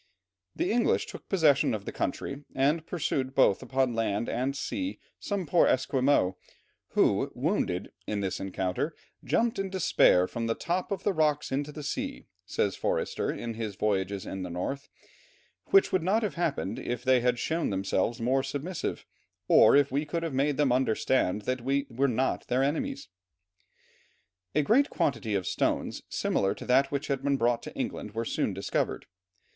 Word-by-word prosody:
The 340 - 0
English 235 0 +2
took - - -11
possession 155 - +3
of 100 -2 -7
the - - -4
country, 140 +1 -3
and 150 +5 +1
pursued 135 -6 -2
both 115 -7 +4
upon 130 -1 0
land 115 -1 -1
and 130 +4 -1
sea 280 - -3 0.2
some 200 -3 -2
poor 165 +3 +4
Esquimaux, 130 -8 +2 0.6
who, - - +2
wounded 90 0 -1 0.2
"in 105 - -1
this 95 -2 -2
encounter, 95 - -2 0.3
jumped 235 -1 +1
in 195 0 -1
despair 160 - +4
from 115 -1 -3
the 115 - 0
top 180 +3 -2
of 195 -1 -2
the 205 - +1
rocks 150 -3 +1
into 145 +2 -1
the 150 0 -8
sea," 270 - -4 0.2
says 100 - 0
Forster - - -1
in 115 -1 -5
his 110 -3 -4
Voyages 100 -1 -1
in 95 - -5
the 90 - -4
North, 90 +11 -4 0.8
"which 390 0 +5
would 185 - +2
not 200 +7 +1
have 210 - -1
happened 155 - -2
if 120 0 -4
they 130 0 +4
had 125 0 +2
shown 165 +6 -1
themselves 95 +3 0
more 130 +3 +2
submissive, 145 +6 -4 0.4
or - - +7
if 140 -1 +4
we 140 +3 0
could 165 +2 -3
have 165 -4 -3
made 140 +2 +1
them 145 -4 +3
understand 110 -4 +1
that 130 +2 -2
we 135 +3 0
were 135 +4 +1
not 130 +1 -1
their 125 +2 +2
enemies." 210 - -2 1.5
A 150 - +3
great 260 - +4
quantity 115 -6 -1
of 95 -2 -1
stones - - -1
similar 95 0 0
to - - -9
that 135 +2 +3
which 140 0 -2
had 135 -2 -1
been 140 0 +1
brought 120 -1 +1
to - - -9
England 105 +1 -4
were 115 +1 -1
soon 110 - -1
discovered. 95 +1 -2
135 Hz, 175 wpm, -28 LUFS, 115-155 Hz, 1.5 s, or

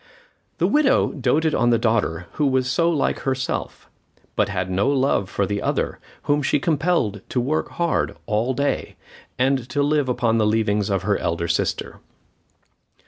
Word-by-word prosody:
The - - +1
widow 295 -2 +3
doted 150 +4 +1
on 120 +1 +2
the 120 - +4
daughter 110 -7 0
who 150 - 0
was 130 -1 +1
so 170 +6 +2
like 155 -5 0
herself, 130 -1 -3 0.5
but - - +1
had 95 -3 -2
no 95 +7 +1
love 135 -8 +1
for 100 - 0
the 100 +1 -2
other, - - -1 0.2
whom 145 0 +1
she 145 +1 +1
compelled 150 - 0
to 125 - 0
work 145 +6 -1
hard 170 -1 -1
all 115 +5 0
day, 140 +2 -1 0.4
and 130 -1 +1
to 145 +4 0
live 145 -2 +1
upon 115 -2 +1
the 105 - +3
leavings 105 -1 +1
of 95 -1 0
her 100 +1 +1
elder 85 0 -1
sister. 85 - -2
125 Hz, 165 wpm, -22 LUFS, 105-145 Hz, 0.5 s, the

